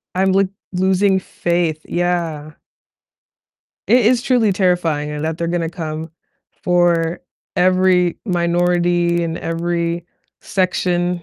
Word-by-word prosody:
I'm, 190 Hz, +1 st, +2 dB
like, 195 Hz, +1 st, +3 dB, 0.3 s
losing 190 Hz, +1 st, +2 dB
faith 170 Hz, -3 st, -1 dB
yeah. 170 Hz, -4 st, -2 dB, 1.4 s
It 240 Hz, +3 st, +4 dB
is 240 Hz, +2 st, +3 dB
truly 245 Hz, -6 st, +2 dB
terrifying 165 Hz, -6 st, 0 dB
that 160 Hz, +1 st, -2 dB
they're 170 Hz, -, -1 dB
gonna 170 Hz, -1 st, -1 dB
come 160 Hz, -2 st, -5 dB, 0.5 s
for 175 Hz, -1 st, +2 dB, 0.4 s
every 185 Hz, -1 st, +3 dB
minority 175 Hz, -1 st, +1 dB
and 165 Hz, 0 st, -3 dB
every 170 Hz, 0 st, -2 dB, 0.4 s
section, 180 Hz, -2 st, -1 dB
175 Hz, 100 wpm, -19 LUFS, 170-185 Hz, 1.4 s, It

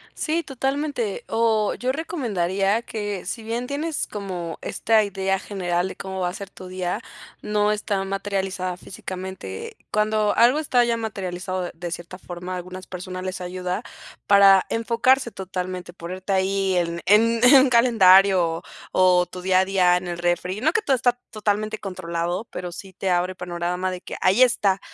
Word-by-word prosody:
Sí, 330 Hz, +2 st, -1 dB
totalmente. 270 Hz, -5 st, -2 dB
Oh, 220 Hz, -2 st, +2 dB
yo 255 Hz, +1 st, -1 dB
recomendaría 210 Hz, -, 0 dB
que, 205 Hz, -5 st, -5 dB
si 225 Hz, +5 st, -5 dB
bien 235 Hz, +3 st, -3 dB
tienes 295 Hz, +3 st, -2 dB
como 185 Hz, -5 st, -5 dB
esta 220 Hz, -1 st, +2 dB
idea 195 Hz, -1 st, -1 dB
general 180 Hz, -3 st, -1 dB
de -, -, -7 dB
cómo 190 Hz, -1 st, -6 dB
va 180 Hz, -, +1 dB
a -, -, -7 dB
ser 200 Hz, 0 st, -7 dB
tu 185 Hz, -, -11 dB
día, 185 Hz, -1 st, -3 dB, 0.4 s
no 210 Hz, 0 st, +1 dB
está 210 Hz, -2 st, -1 dB
materializada 195 Hz, -2 st, -3 dB
físicamente. 185 Hz, -, -7 dB
Cuando 215 Hz, 0 st, +1 dB
algo 250 Hz, +6 st, +5 dB
está 255 Hz, -5 st, +3 dB
ya 235 Hz, -1 st, +1 dB
materializado 185 Hz, -4 st, -4 dB
de 175 Hz, -, -5 dB, 0.2 s
de -, -, -6 dB
cierta 175 Hz, +1 st, -7 dB
forma, 180 Hz, 0 st, -7 dB
algunas 185 Hz, +1 st, -8 dB
personas 185 Hz, 0 st, -6 dB
les 185 Hz, 0 st, -4 dB
ayuda 180 Hz, +2 st, -3 dB, 0.4 s
para 195 Hz, -1 st, +6 dB
enfocarse 235 Hz, +2 st, +2 dB
totalmente, 185 Hz, -2 st, -5 dB
ponerte 185 Hz, +3 st, -5 dB
ahí 190 Hz, 0 st, +1 dB
en 170 Hz, -1 st, -1 dB
en 225 Hz, +4 st, +4 dB
en 265 Hz, +1 st, +8 dB
calendario 195 Hz, -6 st, +6 dB
o 165 Hz, +1 st, -2 dB, 0.5 s
o 180 Hz, -, +3 dB
tu 180 Hz, -, -9 dB
día 185 Hz, 0 st, +3 dB
a 190 Hz, -, +3 dB
día 185 Hz, -2 st, +3 dB
en 180 Hz, 0 st, -5 dB
el 175 Hz, -1 st, -4 dB
refri. 175 Hz, +3 st, -1 dB
No 315 Hz, +4 st, +2 dB
que 445 Hz, -, +2 dB
todo 275 Hz, -9 st, +2 dB
está 245 Hz, -1 st, +2 dB, 0.2 s
totalmente 215 Hz, 0 st, -1 dB
controlado, 180 Hz, 0 st, -3 dB
pero 180 Hz, -1 st, -5 dB
sí 190 Hz, +2 st, -10 dB
te 190 Hz, +1 st, -3 dB
abre 180 Hz, +1 st, +1 dB
panorama 180 Hz, +1 st, -2 dB
de 180 Hz, -1 st, -6 dB
que -, -, -7 dB
ahí 190 Hz, +7 st, +4 dB
está, 200 Hz, -6 st, +2 dB
195 Hz, 170 wpm, -23 LUFS, 180-220 Hz, 0.5 s, en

